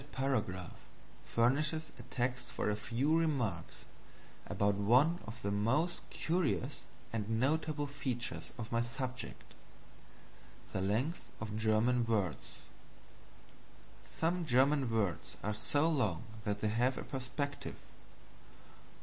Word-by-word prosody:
That 145 Hz, -, -15 dB
paragraph 110 Hz, -10 st, -1 dB, 0.4 s
furnishes 150 Hz, +7 st, +2 dB
a -, -, -5 dB
text 125 Hz, +1 st, -2 dB
for 105 Hz, -, -1 dB
a -, -, +1 dB
few 125 Hz, +8 st, +1 dB
remarks 130 Hz, -, 0 dB, 0.6 s
about 100 Hz, 0 st, +2 dB
one 125 Hz, -, +4 dB
of 115 Hz, +3 st, -7 dB
the 100 Hz, -, 0 dB
most 130 Hz, -, +1 dB
curious 160 Hz, -5 st, 0 dB, 0.3 s
and 110 Hz, 0 st, 0 dB
notable 150 Hz, +2 st, +1 dB
features 120 Hz, -, -3 dB
of 110 Hz, -2 st, -5 dB
my 115 Hz, 0 st, +2 dB
subject 125 Hz, 0 st, -5 dB, 1.2 s
the 95 Hz, -, 0 dB
length 120 Hz, -, 0 dB
of 110 Hz, -1 st, -4 dB
German 110 Hz, +3 st, +3 dB
words. 100 Hz, -, -1 dB, 1.5 s
Some 170 Hz, +2 st, 0 dB
German 135 Hz, -1 st, +4 dB
words 105 Hz, -6 st, -1 dB
are 105 Hz, -, 0 dB
so 145 Hz, +8 st, +2 dB
long 110 Hz, -, +1 dB, 0.2 s
that 105 Hz, -1 st, -1 dB
they 110 Hz, -, +2 dB
have 120 Hz, +4 st, +2 dB
a -, -, -3 dB
perspective. 140 Hz, +1 st, -3 dB
125 Hz, 115 wpm, -35 LUFS, 110-145 Hz, 1.5 s, one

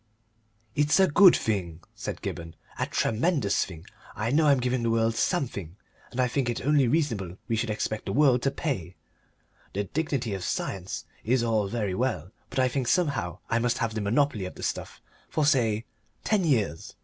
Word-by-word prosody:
"It's 150 Hz, +6 st, +3 dB
a 190 Hz, -, +7 dB
good 180 Hz, +3 st, +7 dB
thing," 90 Hz, -6 st, -2 dB
said -, -, -6 dB
Gibberne, 80 Hz, -1 st, -5 dB, 0.2 s
"a -, -, 0 dB
tremendous 120 Hz, -, +1 dB
thing. 85 Hz, -3 st, -9 dB, 0.3 s
I 110 Hz, +3 st, -1 dB
know 155 Hz, +2 st, +4 dB
I'm 140 Hz, -2 st, +5 dB
giving 125 Hz, 0 st, 0 dB
the 115 Hz, -, 0 dB
world 115 Hz, 0 st, +2 dB
something, 110 Hz, -, -1 dB, 0.3 s
and 130 Hz, -, -7 dB
I 125 Hz, -, +4 dB
think 125 Hz, 0 st, -1 dB
it 120 Hz, -, -3 dB
only 145 Hz, -3 st, +4 dB
reasonable 115 Hz, -, 0 dB
we 115 Hz, -, 0 dB
should 115 Hz, +1 st, -1 dB
expect 105 Hz, 0 st, -2 dB
the -, -, -1 dB
world 130 Hz, -1 st, +4 dB
to 135 Hz, -, +2 dB
pay. 120 Hz, -, -3 dB, 0.8 s
The 100 Hz, -, -1 dB
dignity 130 Hz, -, -2 dB
of 95 Hz, -2 st, -4 dB
science 95 Hz, +1 st, -3 dB, 0.2 s
is 120 Hz, +2 st, +2 dB
all 110 Hz, -3 st, +1 dB
very 105 Hz, -3 st, -2 dB
well, 95 Hz, -6 st, -1 dB, 0.2 s
but -, -, -7 dB
I 130 Hz, -1 st, +4 dB
think 130 Hz, -1 st, -2 dB
somehow 140 Hz, -, 0 dB
I 115 Hz, -, +1 dB
must 120 Hz, 0 st, +1 dB
have 115 Hz, -2 st, -1 dB
the 110 Hz, -, -2 dB
monopoly 110 Hz, 0 st, +1 dB
of 90 Hz, -, -7 dB
the -, -, -9 dB
stuff -, -, -4 dB, 0.3 s
for, 155 Hz, -, +1 dB
say, 115 Hz, -6 st, +2 dB, 0.4 s
ten 205 Hz, -5 st, +2 dB
years. 105 Hz, -, 0 dB
115 Hz, 185 wpm, -27 LUFS, 100-140 Hz, 0.8 s, a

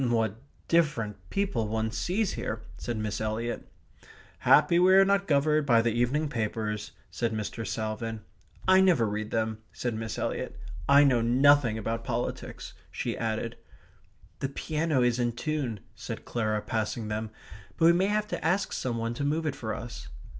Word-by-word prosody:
"What 115 Hz, -1 st, 0 dB, 0.3 s
different 150 Hz, -11 st, +1 dB
people 195 Hz, -, 0 dB
one 110 Hz, +1 st, -1 dB
sees 190 Hz, -, 0 dB
here!" 110 Hz, 0 st, -4 dB
said 115 Hz, +4 st, -4 dB
Miss 105 Hz, -1 st, -3 dB
Eliot. 110 Hz, +2 st, -3 dB, 0.7 s
"Happily 150 Hz, +4 st, +5 dB
we 185 Hz, +1 st, +6 dB
are 195 Hz, 0 st, +7 dB
not 200 Hz, 0 st, +2 dB
governed 150 Hz, 0 st, +2 dB
by 115 Hz, -3 st, +5 dB
the 115 Hz, -, +2 dB
evening 125 Hz, +7 st, +1 dB
papers," 110 Hz, -4 st, -3 dB, 0.2 s
said 115 Hz, -2 st, -1 dB
Mr. 110 Hz, +1 st, -4 dB
Salvin. 110 Hz, 0 st, -3 dB, 0.5 s
"I 190 Hz, 0 st, +7 dB
never 170 Hz, -12 st, +4 dB
read 105 Hz, +1 st, -3 dB
them," 110 Hz, -1 st, -1 dB
said 120 Hz, -2 st, -3 dB
Miss 110 Hz, 0 st, -4 dB
Eliot. -, -, -3 dB, 0.3 s
"I 140 Hz, +1 st, +8 dB
know 130 Hz, -4 st, +4 dB
nothing 125 Hz, 0 st, +4 dB
about 115 Hz, +1 st, -3 dB
politics," 120 Hz, 0 st, -4 dB, 0.2 s
she -, -, -3 dB
added. 115 Hz, +1 st, -2 dB, 0.8 s
"The 135 Hz, -, -2 dB
piano 150 Hz, -1 st, 0 dB
is 120 Hz, 0 st, +2 dB
in 120 Hz, -1 st, +1 dB
tune," 130 Hz, -6 st, -2 dB
said -, -, -7 dB
Clara, 110 Hz, -3 st, -1 dB
passing 110 Hz, 0 st, -2 dB
them, 110 Hz, +1 st, -3 dB, 0.5 s
"but 165 Hz, -, +3 dB
we 170 Hz, -, +8 dB
may 185 Hz, +3 st, +2 dB
have 210 Hz, +1 st, 0 dB
to -, -, -4 dB
ask 190 Hz, +5 st, +1 dB
some 120 Hz, -2 st, -2 dB
one 115 Hz, 0 st, -2 dB
to 130 Hz, -, -4 dB
move 155 Hz, +3 st, 0 dB
it 150 Hz, -, -1 dB
for 110 Hz, -2 st, -4 dB
us." 110 Hz, -, -6 dB
120 Hz, 170 wpm, -28 LUFS, 110-150 Hz, 0.8 s, I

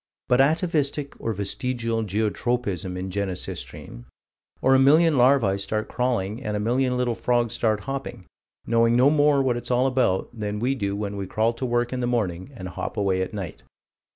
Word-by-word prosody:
But 125 Hz, +1 st, +4 dB
atavistic, 150 Hz, -2 st, 0 dB
or 115 Hz, -, -1 dB
vestigial, 115 Hz, +3 st, -2 dB
geotropism 105 Hz, -2 st, -2 dB
in 95 Hz, +1 st, -4 dB
Genesistrine 95 Hz, -10 st, -5 dB, 0.5 s
or 130 Hz, -, +3 dB
a 135 Hz, -, +6 dB
million 155 Hz, +4 st, +5 dB
larvae 120 Hz, -6 st, +4 dB
start 110 Hz, +2 st, -3 dB
crawling, 120 Hz, -2 st, -1 dB
and 105 Hz, -3 st, -2 dB
a -, -, -2 dB
million 125 Hz, +4 st, +1 dB
little 125 Hz, -1 st, 0 dB
frogs 120 Hz, 0 st, 0 dB
start 110 Hz, -3 st, 0 dB
hopping 135 Hz, -7 st, -6 dB, 0.4 s
knowing 115 Hz, 0 st, +3 dB
no 130 Hz, +4 st, +5 dB
more 145 Hz, -2 st, +4 dB
what 125 Hz, -2 st, +1 dB
it's 120 Hz, -, -5 dB
all 125 Hz, +1 st, +2 dB
about 125 Hz, -8 st, +1 dB
than 105 Hz, -2 st, -4 dB
we 125 Hz, +5 st, 0 dB
do 100 Hz, -6 st, -2 dB
when 100 Hz, -1 st, -4 dB
we 100 Hz, -1 st, -4 dB
crawl 110 Hz, +4 st, +1 dB
to 125 Hz, +2 st, -4 dB
work 120 Hz, +1 st, 0 dB
in 130 Hz, -, -2 dB
the 120 Hz, -, -1 dB
morning 100 Hz, -5 st, -1 dB
and 95 Hz, -4 st, -7 dB
hop 85 Hz, -, -5 dB
away 95 Hz, -2 st, +1 dB
at 95 Hz, -, -3 dB
night. 95 Hz, -7 st, -6 dB
115 Hz, 180 wpm, -24 LUFS, 100-130 Hz, 0.5 s, a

